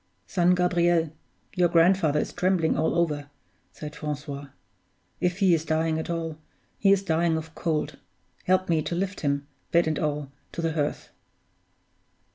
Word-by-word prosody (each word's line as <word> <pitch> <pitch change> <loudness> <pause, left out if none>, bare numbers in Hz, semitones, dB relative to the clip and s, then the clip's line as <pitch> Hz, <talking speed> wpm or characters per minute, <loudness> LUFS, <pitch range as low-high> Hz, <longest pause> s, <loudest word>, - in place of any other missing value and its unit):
"Son 180 -1 +3
Gabriel, 175 -3 +2 0.4
your 180 -2 +3
grandfather 165 -3 +4
is - - -3
trembling 180 -3 +2
all 160 - +1
over," 150 -4 0 0.4
said 150 -1 -8
Francois. 145 -1 -5 0.7
"If 180 0 0
he 195 -3 +4
is 160 -2 +2
dying 160 0 0
at 160 - -5
all, 165 -2 -3 0.4
he 195 - +4
is 200 0 +4
dying 165 -2 +2
of 160 0 -7
cold; 150 -4 -2 0.5
help 185 0 +3
me 165 -2 +2
to 170 - -3
lift 195 +2 -2
him, 140 -1 0 0.3
bed 170 0 +4
and 155 -1 0
all, 150 -2 -2 0.2
to 170 - -3
the 165 -1 0
hearth." 150 -2 -2
165 Hz, 155 wpm, -26 LUFS, 150-175 Hz, 0.7 s, grandfather